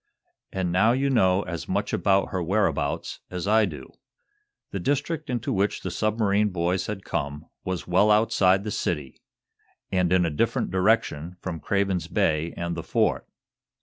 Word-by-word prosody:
An' 95 Hz, -2 st, -1 dB
now 110 Hz, +6 st, +4 dB
you 135 Hz, +2 st, +1 dB
know 95 Hz, -5 st, +3 dB
as 85 Hz, -2 st, -6 dB
much 100 Hz, +2 st, -1 dB
about 100 Hz, -1 st, +2 dB
her 95 Hz, -, -2 dB
whereabouts 100 Hz, +4 st, -1 dB
as 90 Hz, +1 st, -4 dB
I 110 Hz, +1 st, +5 dB
do." 75 Hz, -8 st, -8 dB, 0.8 s
The 100 Hz, -, -3 dB
district 145 Hz, -, -1 dB
into 120 Hz, -3 st, -1 dB
which 100 Hz, +1 st, 0 dB
the 95 Hz, -, -4 dB
submarine 105 Hz, +1 st, +1 dB
boys 90 Hz, 0 st, -1 dB
had 105 Hz, -3 st, -5 dB
come 70 Hz, +2 st, -3 dB, 0.2 s
was 95 Hz, -1 st, -3 dB
well 95 Hz, +4 st, +3 dB
outside 100 Hz, -3 st, +4 dB
of -, -, -10 dB
the 105 Hz, -, -4 dB
city, 75 Hz, -8 st, -3 dB, 0.7 s
and 90 Hz, -2 st, +1 dB
in 90 Hz, -1 st, +4 dB
a 85 Hz, -, -1 dB
different 75 Hz, -, 0 dB
direction 90 Hz, -4 st, +1 dB
from 85 Hz, -3 st, -5 dB
Craven's 95 Hz, -4 st, 0 dB
Bay 85 Hz, -5 st, +1 dB
and 85 Hz, 0 st, -3 dB
the 85 Hz, -, -4 dB
Fort. -, -, 0 dB
95 Hz, 165 wpm, -25 LUFS, 85-105 Hz, 0.8 s, I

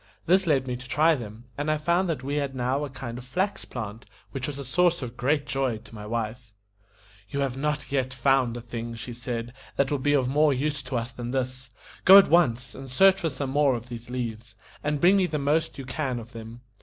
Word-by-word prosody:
This 190 Hz, +2 st, +3 dB
led 135 Hz, -4 st, +2 dB
me 125 Hz, -, -2 dB
to 125 Hz, +1 st, -10 dB
try 155 Hz, +5 st, +4 dB
them, 115 Hz, -4 st, -7 dB
and 145 Hz, +1 st, -1 dB
I 155 Hz, -, +2 dB
found 170 Hz, +4 st, +1 dB
that 150 Hz, -6 st, -2 dB
we 140 Hz, +2 st, -2 dB
had 140 Hz, -2 st, -2 dB
now 130 Hz, +3 st, 0 dB
a 145 Hz, -, -4 dB
kind 130 Hz, -3 st, -6 dB
of -, -, -9 dB
flax 185 Hz, +11 st, -2 dB
plant, 110 Hz, -2 st, -7 dB, 0.2 s
which 130 Hz, +1 st, -3 dB
was 145 Hz, -2 st, -5 dB
a 140 Hz, -, -6 dB
source 175 Hz, +3 st, +2 dB
of 120 Hz, -1 st, -6 dB
great 145 Hz, +4 st, +1 dB
joy 135 Hz, -5 st, -1 dB
to 115 Hz, +2 st, -16 dB
my 105 Hz, -1 st, -8 dB
wife. 115 Hz, +1 st, -4 dB, 0.8 s
"You 140 Hz, -, -2 dB
have 135 Hz, -3 st, -1 dB
not 150 Hz, +2 st, -2 dB
yet 130 Hz, -2 st, 0 dB
found 130 Hz, -2 st, +2 dB
a -, -, -6 dB
thing," 115 Hz, 0 st, -6 dB
she 120 Hz, +2 st, -6 dB
said, 120 Hz, -1 st, -4 dB, 0.2 s
"that 140 Hz, 0 st, +1 dB
will 145 Hz, -, +1 dB
be 145 Hz, +2 st, +2 dB
of 135 Hz, -3 st, +3 dB
more 145 Hz, +1 st, +3 dB
use 140 Hz, +2 st, -1 dB
to 125 Hz, -1 st, -3 dB
us 120 Hz, +2 st, -3 dB
than 120 Hz, -1 st, -6 dB
this. 130 Hz, 0 st, -3 dB, 0.3 s
Go 190 Hz, +2 st, +10 dB
at 200 Hz, -, +7 dB
once 125 Hz, -7 st, +3 dB
and 135 Hz, 0 st, -9 dB
search 190 Hz, +8 st, +5 dB
for 165 Hz, -, +1 dB
some 135 Hz, -1 st, -4 dB
more 140 Hz, -2 st, +3 dB
of 120 Hz, +1 st, -7 dB
these 120 Hz, 0 st, -8 dB
leaves, 115 Hz, -3 st, -5 dB, 0.3 s
and 150 Hz, 0 st, 0 dB
bring 185 Hz, +6 st, +6 dB
me 185 Hz, -2 st, +3 dB
the 155 Hz, -, -2 dB
most 150 Hz, +3 st, 0 dB
you 135 Hz, -, -6 dB
can 130 Hz, 0 st, -2 dB
of 115 Hz, 0 st, -8 dB
them. 115 Hz, +1 st, -9 dB
130 Hz, 240 wpm, -26 LUFS, 120-150 Hz, 0.8 s, Go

